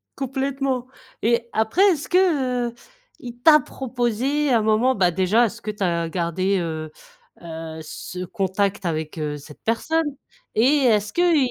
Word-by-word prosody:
Complètement 270 -1 -2 0.3
et 235 +1 +1
après, 220 - +1
est-ce 305 -5 -3
que, 270 -10 +2
heu, - - -13 0.5
il 240 -1 -9
t'a 305 +2 +7
proposé 260 +3 -1
à 235 - +4
un - - 0
moment 220 +4 +3
bah, 180 -3 +3
déjà, 190 +7 +3
est-ce 215 - -5
que 215 - -3
tu 210 -1 -5
as 170 -2 0
gardé, 185 +3 0
heu, 160 -2 -4 0.5
heu, 160 -1 -7
ce 180 +4 -7
contact 195 0 -1
avec, 160 -1 -3
heu, 150 -1 -2
cette 145 +1 -14
personne? 315 +9 +1 0.5
Et 220 - +3 0.2
est-ce 210 -2 +2
qu'il 350 -1 +3
220 Hz, 155 wpm, -23 LUFS, 180-260 Hz, 0.5 s, t'a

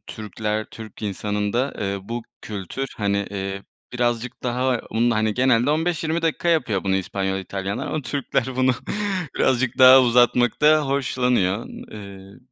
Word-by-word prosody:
Türkler, 110 0 -4
Türk 110 -2 -11
insanında, 105 +5 -1
eee, 100 -1 -2
bu 120 0 -3 0.2
kültür, 105 +6 -5
hani, 100 -1 0
eee, 95 0 -4 0.3
birazcık 120 0 -2
daha 125 0 0
bunu, 115 +2 +2
hani, 110 0 +1
genelde 125 0 +3
15-20 160 +1 0
dakika 165 +1 0
yapıyor 125 - +1
bunu 95 -1 +2
İspanyol, 95 0 -2
İtalyanlar, 100 +7 -4
ama 150 +1 -3
Türkler 130 0 -2
bunu 130 0 +3 0.7
birazcık 130 -1 +1
daha 130 0 +9
uzatmaktan 125 +5 +4
hoşlanıyor. 125 -7 0 0.3
Eee, 100 -2 -11
120 Hz, 130 wpm, -22 LUFS, 100-130 Hz, 0.7 s, daha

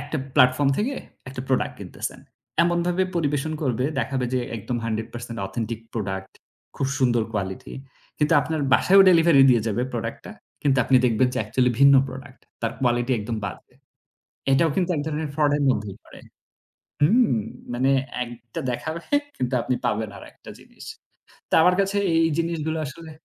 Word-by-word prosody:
একটা - - -4 0.2
platform 130 0 +4
থেকে 250 +7 -1 0.3
একটা 130 -1 -6
product 130 - 0
কিনতেছেন - - -6 0.4
এমনভাবে 175 +1 +1
পরিবেশন 150 -1 -1
করবে 125 -2 0
দেখাবে 130 +1 -1
যে 130 - +1 0.2
একদম 115 +3 -4
100% 115 +1 -5
authentic 110 +3 -4
product 95 -3 -4 0.4
খুব 135 - -1
সুন্দর 120 -3 +2
quality 95 -3 -4 0.4
কিন্তু 150 +1 +2
আপনার 160 +1 -2
বাসায়ও 195 +8 +6
delivery 165 -5 +6
দিয়ে 120 -3 +3
যাবে 110 +2 0
product-টা। 115 - -5 0.3
কিন্তু 135 -2 +2
আপনি 135 - +4
দেখবেন 125 +1 +3
যে - - -1
actually 125 -1 +1
ভিন্ন 140 0 +8
product 130 0 -10 0.2
তার 115 -1 -1
quality 120 0 +1
একদম 110 +2 -4
বাজে। 125 - -8 0.8
এটাও 160 +5 +4
কিন্তু 185 -1 0
এক 145 - -1
ধরনের 155 0 -3
fraud-এর 145 -1 +2
মধ্যেই 105 -6 -2
পড়ে - - -14 0.8
হুম। 205 - +4 0.3
মানে 130 +3 +2 0.3
একটা 120 -1 -9
দেখাবে 155 +7 -4 0.4
কিন্তু 125 +1 -2
আপনি 125 - -1
পাবেন 110 0 -1
আরেকটা - - -14
জিনিস। - - -15 0.6
তো - - -8
আমার 180 +2 +5
কাছে 195 +1 +1 0.2
এই 165 0 +4
জিনিসগুলো 160 -1 -1
আসলে 160 +3 -9
130 Hz, 150 wpm, -24 LUFS, 120-160 Hz, 0.8 s, ভিন্ন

